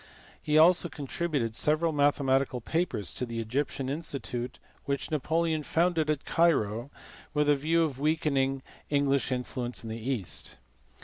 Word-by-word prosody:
He 150 0 +2
also 170 +2 +6
contributed 145 -5 -2
several 155 +5 +2
mathematical 140 -3 +2
papers 120 - -2
to - - -4
the 115 -2 -4
Egyptian 130 +4 -2
In 140 +4 -2
stitute 125 -5 -4 0.3
which 140 +2 -2
Napoleon 160 +1 0
founded 165 +1 +1
at 150 -2 -1
Cairo 125 -8 +2 0.5
with 150 0 +2
a 145 - +5
view 160 +4 +2
of 140 -5 -3
weakening 140 -3 +1 0.3
English 140 -2 +1
influence 125 -1 -3
in 110 - -6
the 115 +1 -6
East. 115 -9 -2
140 Hz, 140 wpm, -29 LUFS, 125-155 Hz, 0.5 s, also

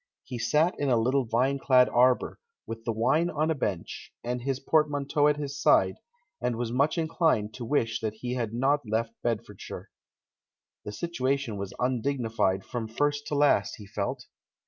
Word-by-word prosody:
He 125 -2 -6
sat 150 +9 +2
in 145 - 0
a 120 - +4
little 130 +3 +2
vine 130 +5 +1
clad 130 -2 +5
arbour, 125 +1 +2 0.3
with 115 0 -7
the 115 - 0
wine 125 +10 +2
on 155 0 0
a - - +3
bench, 100 - -4
and 125 +1 -2
his 135 +1 -2
portmanteau 145 0 +2
at 150 0 +2
his 145 -1 -5
side, - - +4 0.4
and 120 - 0
was 115 0 -3
much 140 +7 +1
inclined 160 - +1
to 120 +1 -6
wish 115 -4 0
that 110 -1 -3
he 120 +3 -4
had 120 -4 -2
not 135 +5 +2
left 115 +1 -1
Bedfordshire. 115 -3 -4 0.9
The - - -4
situation 135 -3 -2
was 100 -1 -6
undignified 120 -6 0
from 120 -2 -4
first 145 +5 -1
to 150 - -2
last, 145 -8 +3
he 105 - -11
felt. 115 +5 -4
125 Hz, 170 wpm, -28 LUFS, 115-145 Hz, 0.9 s, clad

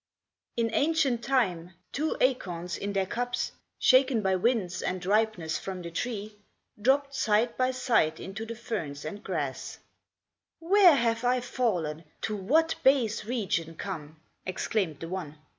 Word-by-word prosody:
In 230 -1 +1
ancient 285 -6 +2
time, 185 -10 0 0.2
two 310 +3 -1
acorns, 180 -9 0
in 200 0 -4
their 195 -1 +1
cups, 245 +5 -2 0.3
Shaken 255 -4 +4
by 190 -1 +2
winds 185 -3 0
and 185 0 -3
ripeness 205 -5 +1
from 185 -2 -6
the 170 - -6
tree, 210 +1 -4 0.4
Dropped 275 +4 +2
side 230 -3 +2
by 255 0 +2
side 250 -11 +1
into 195 +4 -6
the 230 +1 -6
ferns 185 - -5
and 205 0 -6
grass; 150 -8 -3 0.8
"Where 360 -1 +6
have 230 -2 +1
I 250 +1 +3
fallen 180 -11 -1 0.2
to 215 - -2
what 315 +12 +2
base 235 -6 +3
region 200 -8 -1
come?" 155 -5 -6 0.2
Exclaimed 185 -4 -2
the 165 - -4
one. 165 -4 -5
215 Hz, 140 wpm, -28 LUFS, 180-250 Hz, 0.8 s, Where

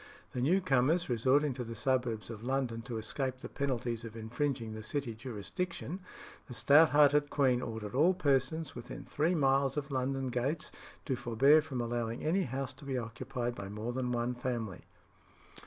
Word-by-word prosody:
The 125 - -3
new 175 +9 +3
comers 155 +2 +2
resorting 130 +5 +3
to 125 0 -4
the 115 0 -7
suburbs 120 -3 0
of 110 -1 -8
London 125 -3 -1
to 115 - -2
escape 130 +4 -2
the - - -7
penalties 120 -4 -2
of 115 -1 -8
infringing 120 0 -2
the 110 - -6
City 120 +2 -3
jurisdiction, 130 - -4 0.5
the 125 - -7
stout 145 +8 +6
hearted 145 +1 +5
queen 130 -4 +2
ordered 110 -4 -5
all 165 +8 +4
persons 145 -1 +1
within 120 - -8
three 160 +5 +1
miles 135 -2 +2
of 145 -1 -3
London 135 0 -1
gates 130 +6 -1 0.3
to 135 - 0
forbear 130 +5 +5
from 140 -5 -4
allowing 120 0 -2
any 170 +6 +2
house 135 +1 -3
to 140 +3 -15
be 135 -2 -2
occupied 120 +1 -3
by 100 -4 -7
more 110 +4 -4
than 125 -1 -1
one 120 +1 0
family. 120 -6 -4
130 Hz, 170 wpm, -32 LUFS, 120-140 Hz, 0.5 s, stout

